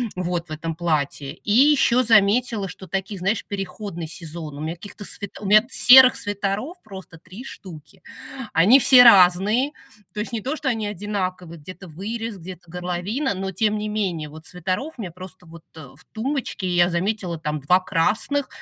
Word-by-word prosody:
вот, 175 -1 -3
в - - -15
этом 165 +1 -5
платье. 150 -4 -2
И 205 - -6
ещё 255 0 +4
заметила, 220 -1 +2
что 185 +2 -11
такие, 195 +2 -4
знаешь, 195 +4 -1
переходный 195 -3 -6
сезон. 160 -3 -8
У - - -7
меня 160 +2 -4
каких-то 205 +3 -11
свит 200 0 -6
у - - -7
меня 215 +3 +5
серых 255 0 +7
свитеров 205 - -3
просто 190 -5 -12
3 185 +9 -12
штуки. 180 - -12 0.5
Они 210 +12 +6
все 250 -1 +8
разные. 205 +6 +5 0.4
То 210 - -3
есть 225 - -6
не 230 - -3
то, 270 +8 -3
что 275 -3 -2
они 220 -3 -2
одинаковые- 185 -4 -5
где-то 185 +3 -11
вырез, 220 +5 -6
где-то 180 -1 -11
горловина- 180 +9 -3
но, 190 0 -4
тем 210 +3 0
не 210 0 -4
менее, 180 -8 -3
вот 155 +1 -12
свитеров 185 - -4
мне 190 -7 -6
просто 185 0 -12
вот, 165 0 -14
э, 145 -5 -11
в 180 - -18
тумбочке. 240 -6 -3
Я 175 0 +3
заметила, 180 -1 -2
там 150 -1 -4
2 180 +7 +2
красных, 220 +11 0
190 Hz, 175 wpm, -22 LUFS, 170-215 Hz, 0.5 s, все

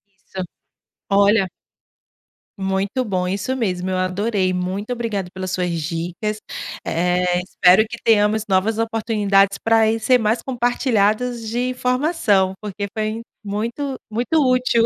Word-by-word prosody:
Isso, 190 -1 -7 0.7
olha 200 0 +4 1.1
Muito 195 +6 -1
bom, 185 -4 -1
isso 200 +8 -2
mesmo. 185 -7 -1
Eu 185 - 0
adorei, 185 +1 0
muito 185 +5 -3
obrigada 225 -6 -2
pelas 185 0 -4
suas 180 -1 -1
dicas, 170 +6 -3 0.4
eh, 180 +1 +1
espero 185 +3 +4
que 235 - -7
tenhamos 215 -1 +3
novas 195 +4 +2
oportunidades 210 -3 +2
pra 225 -1 +3
ir 225 - +1
ser 250 +3 +4
mais 225 +1 +1
compartilhadas 240 -2 0
de 245 +3 -1
informação, 250 - +1
porque 205 -1 -4
foi 215 +1 -2 0.2
muito 235 +7 -3 0.2
muito 245 +8 -1 0.2
útil. 250 -2 +2
210 Hz, 125 wpm, -21 LUFS, 190-230 Hz, 1.1 s, olha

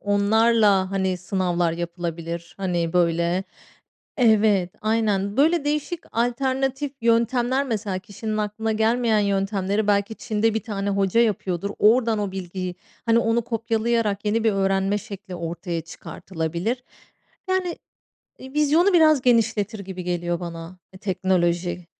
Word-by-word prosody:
onlarla, 205 -1 +3
hani, 190 -1 0
sınavlar 180 -2 0
yapılabilir. 170 0 -5
Hani, 175 -4 -1
böyle, 170 +1 +1 0.7
evet, 215 -6 +3
aynen. 210 -2 0
Böyle 315 +2 +3
değişik 300 +3 -2
alternatif 265 +4 -1
yöntemler, 240 +3 +2
mesela 210 -5 -2
kişinin 215 +2 -5
aklına 215 +1 -2
gelmeyen 225 +1 +2
yöntemleri 200 +1 0
belki 205 +1 +1
Çin'de 220 -1 0
1 220 - -1
tane 200 -3 -3
hoca 195 +2 +2
yapıyordur, 200 -4 0
oradan 225 0 +4
o 205 -2 -2
bilgiyi 185 -1 -5 0.3
hani 230 0 +4
onu 235 0 +1
kopyalayarak 225 -2 -1
yeni 220 +2 0
bir 220 - +4
öğrenme 195 +1 +1
şekli 200 -3 -9
ortaya 170 0 -4
çıkartılabilir. 170 +7 -4 0.6
Yani, 370 -2 0 0.6
eee, 265 0 -11
vizyonu 305 +6 +3
biraz 310 -6 +5
genişletir 220 -3 +2
gibi 190 -2 -7
geliyor 175 -1 -2
bana 170 0 -7 0.2
teknoloji. 180 -3 0
205 Hz, 120 wpm, -23 LUFS, 185-230 Hz, 0.7 s, biraz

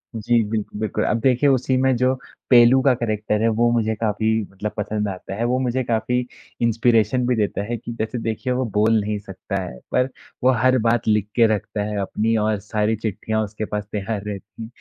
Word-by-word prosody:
जी, 115 +1 +2
बिल्क 110 -2 -2
बिल्कुल। 110 - -1
अब 115 - +1
देखिए 130 +3 +3
उसी 130 0 +2
में 130 0 +3
जो 130 +2 +2 0.4
पेलू 125 +1 +7
का 135 -2 +4
कैरेक्टर 110 -2 -1
है, 115 - +3
वो 115 +1 +2
मुझे 110 -2 +1
काफ़ी 110 0 -1 0.2
मतलब 105 +2 -4
पसंद 105 0 -2
आता 95 +1 -6
है। 115 - -2
वो 125 +1 +1
मुझे 130 0 0
काफ़ी 120 +1 0 0.4
इंस्पिरेशन 115 +1 +2
भी 125 - +2
देता 105 -2 -1
है 120 +3 -3
कि 120 +1 -7
जैसे 110 +1 -3
देखिए, 115 +3 -2
वो 130 0 0
बोल 110 +1 +4
नहीं 105 0 -2
सकता 100 0 -7
है, 65 -9 -8
पर 125 +1 +2 0.3
वो 130 - +6
हर 130 +2 +3
बात 115 0 +2
लिख 105 -2 +2
के 115 -2 +5
रखता 105 0 -3
है 105 0 -3
अपनी 110 +3 0
और 110 -2 0
सारी 105 +1 -1
चिट्ठियाँ 110 0 -2
उसके 105 +1 -5
पास 105 -1 -4
तैयार 105 0 -3
रहतीं। 105 +2 -7
110 Hz, 205 wpm, -22 LUFS, 105-120 Hz, 0.4 s, पेलू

